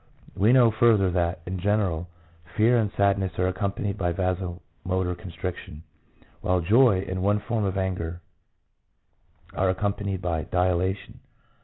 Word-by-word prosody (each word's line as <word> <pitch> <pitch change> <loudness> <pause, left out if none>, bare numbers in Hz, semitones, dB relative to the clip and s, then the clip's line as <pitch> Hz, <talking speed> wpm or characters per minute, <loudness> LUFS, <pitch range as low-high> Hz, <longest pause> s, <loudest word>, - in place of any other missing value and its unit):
We 105 +4 +3
know 125 -3 +6
further 110 -4 +3
that, 85 0 -1
in 90 +1 -4
general, 95 -4 0 0.5
fear 115 +3 +4
and 110 -4 +1
sadness 100 -2 +2
are 90 - +1
accompanied 100 +2 -2
by 90 -2 0
vaso 90 -1 -2 0.2
motor 90 -1 -1
constriction, 85 -3 -7 0.6
while 90 0 +1
joy 100 +1 +4
and 95 0 -3
one 100 +2 +2
form 110 0 -2
of 95 0 -2
anger 90 -3 -3 1.3
are 95 0 +1
accompanied 100 0 -1
by 85 -3 -2
dilation. 90 +2 -1
95 Hz, 135 wpm, -25 LUFS, 90-100 Hz, 1.3 s, know